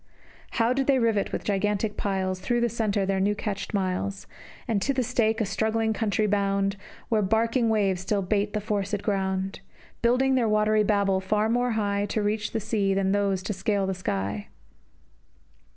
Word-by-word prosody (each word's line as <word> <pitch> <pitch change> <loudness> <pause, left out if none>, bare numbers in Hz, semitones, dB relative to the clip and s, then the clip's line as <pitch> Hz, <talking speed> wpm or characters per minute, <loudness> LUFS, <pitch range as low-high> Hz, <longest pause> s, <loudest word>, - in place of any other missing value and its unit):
How 230 +1 +2
did 270 0 -1
they 275 -2 +4
rivet 225 -5 +1
with - - -3
gigantic 205 +1 0
piles, 190 -2 -1
Thorough 240 +6 0
the 240 - +2
centre, 210 -3 0
their 195 0 0
new 205 +2 +2
catched 205 -2 -4
miles, 195 0 -2 0.4
And 220 -4 0
to 275 +6 0
the 255 - +1
stake 225 -1 +1
a 220 - +1
struggling 220 +2 0
country 215 0 0
bound, 200 -1 +1 0.3
Where 220 -3 +2
barking 230 +4 +2
waves 195 -4 +1
still 200 +1 0
bait 205 +2 0
the 210 - -1
forced 205 -1 -2
ground; 190 -1 -1 0.4
Building 250 +3 +3
their 245 -4 +2
watery 215 0 +3
Babel 200 -2 +2
far 210 +3 +1
more 245 +1 +1
high 205 -1 0
To 210 +1 -1
reach 210 +1 -1
the 225 - -1
sea 205 -2 0
than 195 0 +1
those 200 -2 +1
to 210 - -2
scale 195 +1 0
the 190 - -1
sky! 100 - -3
205 Hz, 180 wpm, -26 LUFS, 195-220 Hz, 0.4 s, they